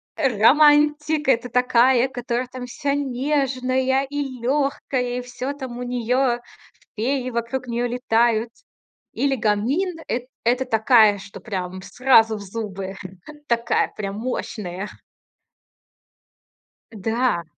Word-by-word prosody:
романтик- 295 +4 +4
это 245 -1 +2
такая, 250 +1 +3
которая 245 -1 -3
там 250 -1 -7
вся 280 +3 -2
нежная 265 -1 0
и 280 -3 -4
лёгкая, 260 -2 -1
и - - -4
всё 250 +3 -5
там 260 -4 -7
у 250 - -4
неё, 245 +1 0 0.6
феи 255 +3 -1
вокруг 235 +2 -3
неё 240 +1 -1
летают. 235 -1 +1 0.6
Или 275 -1 +1
гамин- 255 - 0
эт 245 +1 -3 0.2
это 250 +2 +2
такая, 220 -3 +5
что 195 - -11
прям 185 -3 -5
сразу 225 -4 +3
в - - -9
зубы, 195 -2 -6 1.2
мощная. 205 -4 -4 2.0
Да. 225 -3 0
250 Hz, 100 wpm, -22 LUFS, 225-265 Hz, 2.0 s, такая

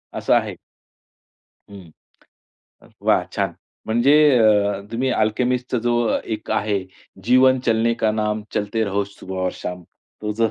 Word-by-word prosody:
असं - - +1
आहे. - - +1 1.1
हं. 95 -5 -12 0.9
अ, - - -19 0.2
वा - - +3
छान! - - -1 0.3
म्हणजे 120 +5 +3 0.3
अ, 105 -2 +3
तुम्ही 125 +3 -1
अल्केमिस्टचा 125 +4 0
जो 120 - +1 0.4
एक 110 - -9
आहे, 105 -2 0 0.4
जीवन 130 +3 +4
चलने 115 +1 +2
का 110 - +3
नाम 105 0 -2
चलते 105 +2 -1
रहो 100 +1 -1
सुबह 95 -1 -9
और 95 - 0
शाम. 90 -1 -7 0.4
तो 105 0 -3
जो 115 0 +1
110 Hz, 135 wpm, -21 LUFS, 100-115 Hz, 1.1 s, जीवन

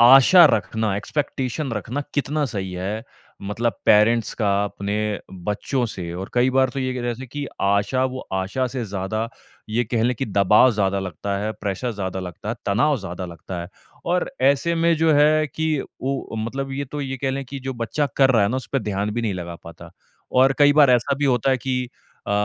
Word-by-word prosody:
आशा 135 +9 +8
रखना, 105 +1 -2
एक्सपेक्टेशन 135 +2 -2
रखना 110 +6 -3
कितना 150 +1 0
सही 95 -5 -4
है 100 +5 -3 0.4
मतलब 115 +4 -1
पेरेंट्स 110 +2 +4
का 105 -3 0 0.2
अपने 100 0 -4 0.5
बच्चों 120 +6 -1
से? 85 -5 -6
और 95 +2 -6
कई 125 +1 +3
बार 130 0 +3
तो 135 - -6
ये 130 0 -1
कह 125 - -3
रहे 120 +2 -3
कि 140 +3 -5
आशा 100 +6 +2
वो 130 0 -3
आशा 95 +7 -1
से 125 -1 -4
ज़्यादा 105 +3 -3 0.4
ये 115 +3 +1
कहले 115 +2 +1
कि 135 - -3
दबाव 105 +4 +5
ज़्यादा 100 -2 0
लगता 95 +2 -4
है, 105 +2 -2
प्रेशर 105 +5 -3
ज़्यादा 95 -2 -4
लगता 90 +3 -7
है, 115 - -1
तनाव 125 +9 +2
ज़्यादा 90 -1 -6
लगता 85 +1 -7
है 85 - -7 0.4
और 180 +6 0
ऐसे 140 +5 +3
में 165 0 +3
जो 160 0 +3
है 155 +1 +4
कि 160 +4 -3 0.4
वो 135 -4 -3
मतलब 135 +3 -4
ये 140 +1 -2
तो 145 +2 -6
ये 135 -1 -3
कह 135 +1 -1
ले 135 +1 -2
कि 135 +2 -7
जो 130 +1 -4
बच्चा 120 +5 -1
कर 135 -1 +5
रहा 115 -5 +4
है 100 - +3
ना 130 - -1
उसपे 135 +1 -2
ध्यान 105 0 -2
भी 120 - -1
नहीं 105 -4 -1
लगा 85 -1 -6
पाता। 85 - -11 0.4
और 130 +1 +5
कई 145 0 +6
बार 145 -3 +6
ऐसा 125 +3 +3
भी 145 - 0
होता 130 -1 +2
है 130 - +3
कि 125 -1 -2 0.4
अ, - - -1
120 Hz, 205 wpm, -22 LUFS, 100-135 Hz, 0.5 s, आशा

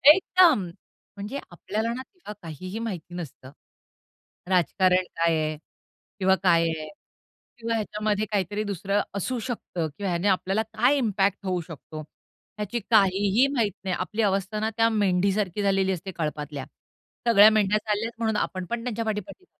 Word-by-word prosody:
एकदम 360 - +4 0.5
म्हणजे 205 +8 -5
आपल्याला 215 +6 -3
ना 255 - -5
तेव्हा 355 - -11
काहीही 185 +6 -6
माहिती 180 -7 -5
नसतं. 140 -6 -8 1.0
राजकारण 185 +1 +3
काय 165 0 +3
आहे? 155 0 -2 0.6
किंवा 190 0 +4
काय 170 -3 +5
आहे? 155 -1 -4 0.7
किंवा 230 -1 -2
ह्याच्यामध्ये 215 -1 -1
काहीतरी 205 +1 -1
दुसरं 200 0 -1
असू 245 +6 -2
शकतं 215 -8 -3
किंवा 200 -2 -2
ह्याने 175 +3 0
आपल्याला 195 +2 +1
काय 225 +6 +2
इम्पॅक्ट 200 -5 0
होऊ 180 -2 0
शकतो? 155 -1 -9
ह्याची 210 +8 -8
काहीही 200 +3 +4
माहीती 220 -8 0
नाही. 185 -2 -1
आपली 220 - -2
अवस्था 200 0 0
ना 220 +1 0
त्या 225 0 +4
मेंढीसारखी 200 -1 +1
झालेली 195 -1 +2
असते 190 +1 -4
कळपातल्या. 150 -4 -4 0.6
सगळ्या 215 -2 +8
मेंढ्या 210 -1 +3
चालल्यात 215 +2 -1
म्हणून 220 -2 0
आपण 185 -1 -2
पण 230 +5 -4
त्यांच्या 235 -2 -2
पाठी-पाठी, 215 - -4
200 Hz, 145 wpm, -26 LUFS, 180-220 Hz, 1.0 s, सगळ्या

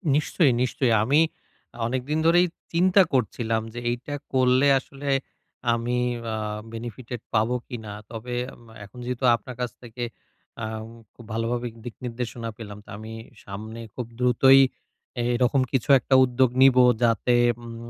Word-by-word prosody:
নিশ্চয়ই, 150 -1 +3
নিশ্চয়ই। 125 -1 +1
আমি 140 +7 +3 0.7
অনেকদিন 130 +6 -1
ধরেই 175 +2 +5 0.3
চিন্তা 185 +3 +5
করছিলাম 115 -2 0
যে 120 - -5
এইটা 125 +4 -4 0.2
করলে 130 +1 +4
আসলে 140 +1 -7 0.6
আমি 120 +1 -1 0.4
আ - - -1 0.4
বেনিফিটেড 120 +1 -7
পাবো 110 +2 +2
কিনা। 110 -5 -7 0.2
তবে 120 +2 -6 0.5
এখন 105 - -16
যেহেতু 125 +1 -4
আপনার 125 +2 -9
কাছ 125 - -2
থেকে 120 0 -7 0.6
আ - - -1 0.5
খুব 120 - -14
ভালোভাবে 120 +2 -1 0.2
দিক 120 - -7
নির্দেশনা 120 -1 -4
পেলাম 105 -3 -8
তো - - -18
আমি 110 +1 -9 0.3
সামনে 110 +3 -8 0.2
খুব 125 - -4
দ্রুতই 130 +2 +6 0.6
এ - - -1
এরকম 125 +2 +2
কিছু 130 0 -1
একটা 130 +2 +1
উদ্যোগ 130 0 +3
নিবো 130 -1 +7 0.2
যাতে 115 +1 +3 0.3
উম 115 0 -9
125 Hz, 140 wpm, -25 LUFS, 115-130 Hz, 0.7 s, নিবো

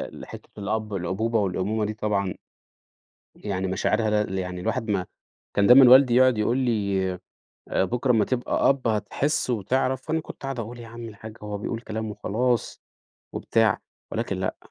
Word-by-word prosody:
ال - - -9
حتة - - -11
الأب 105 +1 -3
الأبوبة 100 +5 -1
والأمومة 100 +2 -1
دي 105 - -3
طبعًا، 100 -3 -1 1.0
يعني 95 -2 -3
مشاعرها 105 +3 +1
لل 95 -1 -4
يعني 90 -1 -4
الواحد 115 +4 -2
ما 95 -3 0 0.5
كان 100 - +3
دايمًا 125 +1 +9
والدي 130 -1 +7
يقعد 130 -2 +5
يقول 115 +4 +1
لي 100 -7 0 0.6
آآ، - - +1
"بكرة 125 +6 -1
أمّا 110 -3 +4
تبقى 125 -1 0
أب، 135 -3 +1
هتحس 125 +6 0
وتعرف." 130 +5 -1
وأنا 160 0 +1
كنت 155 - -11
أقعد 135 -2 -3
أقول: 115 +2 -7
"يا 115 - -10
عم 115 0 -8
الحاج" 110 0 -10
هو 105 -1 -4
بيقول 115 +3 -4
كلام 110 -2 -5
وخلاص 120 +3 -1 0.5
وبتاع، - - +1 0.3
ولكن - - -2
لأ - - -2
110 Hz, 165 wpm, -25 LUFS, 100-125 Hz, 1.0 s, دايمًا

